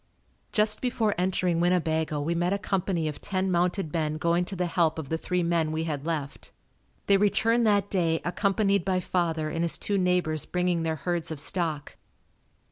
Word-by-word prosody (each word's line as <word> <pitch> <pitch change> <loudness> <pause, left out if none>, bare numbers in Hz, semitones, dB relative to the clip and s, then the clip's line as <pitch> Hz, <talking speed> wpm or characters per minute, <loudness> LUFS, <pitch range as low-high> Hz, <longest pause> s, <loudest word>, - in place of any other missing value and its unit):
Just 210 -1 +2
before 230 -4 +1
entering 180 -1 0
Winnebago 160 -3 +1
we 155 +4 -1
met 175 +2 0
a - - +1
company 185 -4 -1
of 150 - -5
ten 190 -1 -1
mounted 175 -1 0
men 155 -2 -1
going 170 +2 +1
to 195 - -5
the 180 -1 -1
help 165 -2 +1
of 150 -4 -6
the 160 - 0
three 180 0 -1
men 170 -2 +1
we 160 +1 -1
had 150 -2 -4
left. 150 -4 -4 0.5
They 200 - +5
returned 225 +3 +2
that 205 -1 +2
day 165 -4 +1
accompanied 200 +1 +1
by 185 0 +1
father 165 -3 -1
and 165 +1 -2
his 170 - 0
two 200 -1 -1
neighbors 180 -4 0
bringing 180 -1 0
their 160 -1 -1
herds 165 +2 -2
of 160 -3 -5
stock. 155 -2 -3
175 Hz, 185 wpm, -27 LUFS, 160-190 Hz, 0.5 s, They